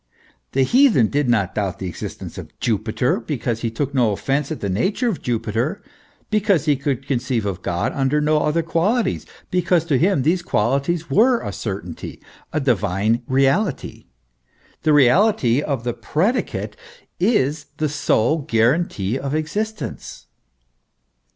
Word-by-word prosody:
The 135 - +3
heathen 235 - +4
did 145 -2 0
not 100 -6 +1
doubt 100 -4 -2
the 95 - -6
existence 90 - -7
of - - -12
Jupiter, 110 +3 0
because 120 -2 -3
he 115 - -1
took 140 +5 -3
no 120 -5 +3
offence 135 +8 -1
at 155 - -3
the 100 - -3
nature 190 - 0
of 215 -8 -2
Jupiter, 120 - -2 0.5
because 205 -7 +2
he 150 -2 +3
could 135 -1 -2
conceive 125 -4 -1
of 95 -3 -3
God 85 0 -1
under 135 +2 +1
no 150 +1 +2
other 155 +2 +1
qualities, 185 +7 0 0.2
because 180 -2 +2
to 145 -6 +1
him 180 -5 +2
these 170 +5 +2
qualities 140 +6 0
were 240 +4 +4
a - - -4
certainty, 95 -6 -6 0.3
a 155 - 0
divine 115 -4 +1
reality. 135 +10 0 0.7
The 155 - +2
reality 145 - +4
of 140 -6 -2
the 120 0 -1
predicate 160 - -1 0.4
is 155 - +1
the 155 - 0
sole 150 0 +1
guarantee 125 - +1
of 140 +2 -3
existence. 210 +8 -4
140 Hz, 145 wpm, -21 LUFS, 115-170 Hz, 0.7 s, heathen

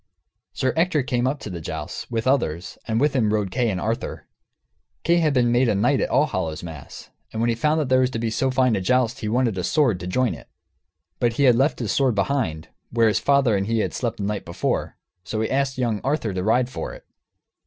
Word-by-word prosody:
Sir 130 -1 0
Ector 160 -3 +2
came 125 0 0
up 140 +2 -1
to 105 - -6
the 85 -2 -6
jousts, - - -6
with 115 -1 -2
others, 95 - 0
and 110 -1 0
with 145 +2 +2
him 110 -5 +2
rode 105 -3 0
Kay 120 +1 +1
and 95 -3 -2
Arthur. 115 +5 -3 0.8
Kay 170 +1 +3
had 160 -3 +3
been 125 -3 +2
made 120 0 +3
a 105 - +2
knight 125 +8 +2
at - - 0
Allhallowmas, 85 - -2 0.2
and 110 - -5
when 115 +1 +2
he 115 - +1
found 150 +4 +1
there 130 0 +4
was 130 -1 +3
to 130 - -4
be 115 0 -2
so 130 +4 0
fine 130 -3 +2
a 95 - -1
joust 125 +5 +1
he 110 - -3
wanted 115 -4 +1
a - - -2
sword, 125 - +2
to 90 - -6
join 125 +6 +1
it. - - -12 0.7
But 120 -2 +2
he 140 - 0
had 125 -3 +7
left 135 +5 +2
his 110 -6 -2
sword 130 -2 +2
behind, 100 - -1 0.2
where 115 -1 +3
his 105 - +1
father 140 -6 +3
and 100 0 -1
he 115 0 0
had - - -2
slept 120 -3 -2
the 100 - -4
night 105 0 -2
before. 85 - -2 0.3
So 110 +3 -4
he 110 - -1
asked 135 0 0
young 115 -5 -1
Arthur 135 -7 -1
to 90 - -2
ride 120 +4 +2
for 125 - -6
it. - - -15
120 Hz, 235 wpm, -23 LUFS, 105-130 Hz, 0.8 s, had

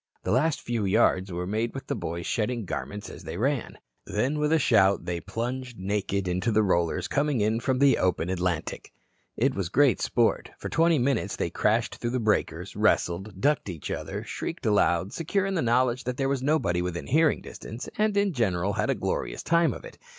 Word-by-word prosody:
The - - -1
last 150 +6 +2
few 115 -2 -2
yards 95 -2 +2
were 90 +1 -3
made 110 +6 -2
with 135 - -6
the - - -2
boys 85 -6 -4
shedding 115 0 -1
garments 100 +3 -5
as - - -10
they - - -6
ran. 135 +4 -1 0.3
Then 130 +8 -1
with 150 0 +1
a 160 - +5
shout 100 -9 +3
they 85 -1 -3
plunged 125 +1 -4
naked 100 0 -1
into 90 +6 0
the 110 0 +3
rollers 85 -4 +1
coming 145 -3 +1
in 110 +2 +1
from 130 +1 0
the 140 0 +4
open 90 -2 +1
Atlantic. 90 -3 -2 0.5
It 130 +3 +2
was 95 -4 -2
great 135 -2 +3
sport. - - +1
For - - -6
twenty 165 +2 +3
minutes 135 +1 0
they - - -2
crashed - - +1
through 120 +2 -2
breakers, 110 -1 0
wrestled, 95 +3 +1
ducked 145 -3 +1
each 85 -5 -6
other, - - -4
shrieked - - -5
aloud 95 -3 +2
secure 185 +4 0
in 195 - -1
the 175 - +1
knowledge 120 +1 +2
there 125 +2 -1
was 135 -1 0
nobody 130 - +1
within 90 -1 -3
hearing 155 +2 +3
distance, 115 +3 -8
and 210 -1 +1
in 200 -2 +2
general 100 - 0
had - - -1
a - - +2
glorious - - -3
time 170 0 +3
of - - -8
it. - - -12
115 Hz, 195 wpm, -27 LUFS, 95-140 Hz, 0.5 s, a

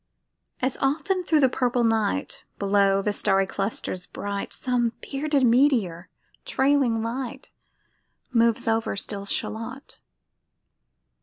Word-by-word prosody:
As 260 0 0
often 360 +7 0
thro' 320 -3 +3
the 270 - +5
purple 245 -1 0
night, 220 - 0
Below 195 -1 +2
the 210 - 0
starry 195 -2 +2
clusters 195 -2 -4
bright, 200 0 -5
Some 240 -2 0
bearded 285 0 -1
meteor, 230 -9 +2 0.3
trailing 265 -5 +2
light, 255 +3 -5 0.8
Moves 230 -1 +2
over 225 -2 +1
still 200 0 -4
Shalott. 230 +7 -4
230 Hz, 105 wpm, -25 LUFS, 200-265 Hz, 0.8 s, the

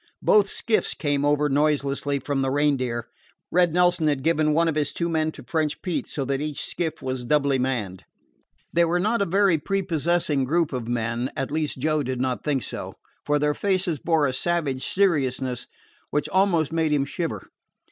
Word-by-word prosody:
Both 205 -2 +4
skiffs 225 -2 0
came 145 -2 0
over 145 0 +2
noiselessly 145 -1 +1
from 140 0 -1
the 135 - 0
Reindeer. 130 -5 0 0.4
Red 175 -1 +3
Nelson 180 -1 +3
had 145 -3 0
given 155 -1 +2
one 165 +2 +3
of 165 - +1
his 150 -1 -1
two 170 - -1
men 160 -1 0
to - - -11
French 160 -5 -1
Pete, 180 -3 -2
so 140 - -3
that 135 +1 -1
each 150 -1 -3
skiff 165 -3 -3
was 130 -1 -3
doubly 140 0 +2
manned. 115 -8 -2 0.7
They 170 - +4
were 170 +1 +1
not 215 +4 +1
a - - +3
very 195 -2 +3
prepossessing 170 -4 0
group 160 +2 +1
of 125 -3 -3
men, 120 +1 -1
at 135 +1 -2
least, 155 -2 -1
Joe 155 +3 +1
did 130 -2 -3
not 130 -1 -1
think 140 -4 0
so, - - -6 0.3
for 150 0 +3
their 150 0 +1
faces 185 -4 0
bore 160 -1 +2
a 130 - 0
savage 145 -3 0
seriousness 135 -10 0 0.4
which 150 0 -1
almost 175 -5 +2
made 160 -2 +1
him 145 -2 +2
shiver. 170 +3 -5
150 Hz, 185 wpm, -24 LUFS, 135-170 Hz, 0.7 s, Both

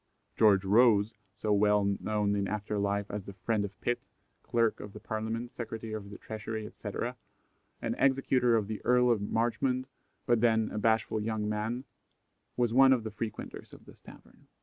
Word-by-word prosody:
George 100 -3 +5
Rose, 110 0 +4 0.2
so 105 -1 0
well 105 0 +4 0.2
known 105 -1 0
in 100 -1 0
after 105 0 -2
life 100 0 0
as 105 -2 -5
the 100 - -8
friend 100 +3 -1
of 100 0 -7
Pitt, 120 0 -1 0.4
Clerk 115 -2 +1
of 105 -1 -9
the 105 - -9
Parliament, 110 +3 -4
Secretary 115 -2 -6
of 105 -2 -6
the 100 - -9
Treasury, 110 0 -5
etc., - - -5 0.7
and - - 0
executor 130 -3 +3
of 110 -2 +1
the 110 -1 -5
Earl 125 0 +4
of 110 -4 +1
Marchmont, 120 +4 0 0.4
but 120 -3 +2
then 110 -2 +3
"a 105 - -3
bashful 110 0 +1
young 110 -1 -2
man," 110 +4 -2 0.7
was 120 -2 +1
one 135 +1 +7
of 120 -4 0
the 110 - -5
frequenters 110 0 -6
of - - -14
this - - -16
tavern. - - -16
110 Hz, 175 wpm, -30 LUFS, 105-120 Hz, 0.7 s, one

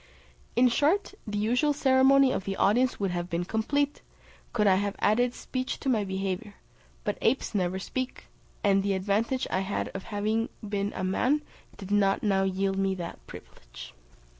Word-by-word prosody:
In 250 +1 +5
short, 305 +12 +1
the 210 0 -3
usual 245 +8 +2
ceremony 270 -1 +5
of 190 - -2
the 195 - -2
audience 245 +6 +2
would 195 -2 0
have 175 0 -3
been 175 0 -1
complete, 280 +8 0 0.5
could 210 -3 +1
I 190 -2 +5
have 200 +1 -1
added 245 +4 +2
speech 255 0 -4
to 270 - -2
my 220 -5 +2
behaviour; 195 +2 -3 0.5
but 205 - -2
apes 250 +1 +1
never 185 -2 0
speak, 255 +6 -4 0.4
and 195 -1 +4
the 200 0 0
advantage 210 +7 0
I 185 - +1
had 195 +1 -2
of 195 - -7
having 215 +2 -1 0.2
been 200 0 -1
a - - -3
man 255 +11 +1 0.3
did 195 0 -8
not 200 -1 +2
now 195 -2 +2
yield 195 0 0
me 195 -1 +1
that 175 - -6
privilege. - - -12
205 Hz, 170 wpm, -28 LUFS, 195-250 Hz, 0.5 s, In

